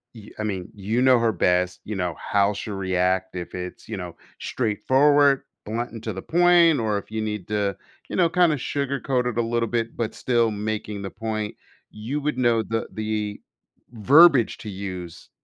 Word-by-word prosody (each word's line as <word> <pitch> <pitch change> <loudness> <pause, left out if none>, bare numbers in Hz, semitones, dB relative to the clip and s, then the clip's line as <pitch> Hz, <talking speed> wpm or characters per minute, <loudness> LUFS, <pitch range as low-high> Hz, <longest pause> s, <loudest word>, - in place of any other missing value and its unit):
y 110 -2 -12
I 110 - -2
mean, 95 -4 -3
you 105 +4 -1
know 130 -1 +5
her 115 -1 +2
best, 90 -2 +1
you 105 - -4
know, 90 -3 -2
how 100 0 +1
she'll 100 0 -5
react, 95 0 0
if 90 -1 -6
it's, 90 +3 -7
you 110 - -4
know, 90 -2 -7 0.2
straightforward, 135 +5 +3 0.2
blunt, 115 +3 -3
and 115 -1 -9
to 110 - -3
the 95 - -6
point, 170 - +4
or 105 -2 0
if 105 - -15
you 110 - -2
need 105 -4 -4
to, 100 -2 0 0.3
you - - -4
know, 175 -3 +3
kinda 175 -3 +3
sugarcoat 135 -1 -1
it 120 -2 -3
a - - +4
little 115 0 0
bit 115 -1 -2
but 115 -2 -2
still 120 -2 +1
making 105 0 -4
the 95 - -6
point, 110 -2 -4 0.4
you 120 +8 -4
would 150 -2 -2
know 120 -3 +3
the 115 0 -3
the 105 -1 -3 0.5
verbiage 135 +3 +5
to 110 - -7
use 95 -3 -7
110 Hz, 185 wpm, -24 LUFS, 100-125 Hz, 0.5 s, know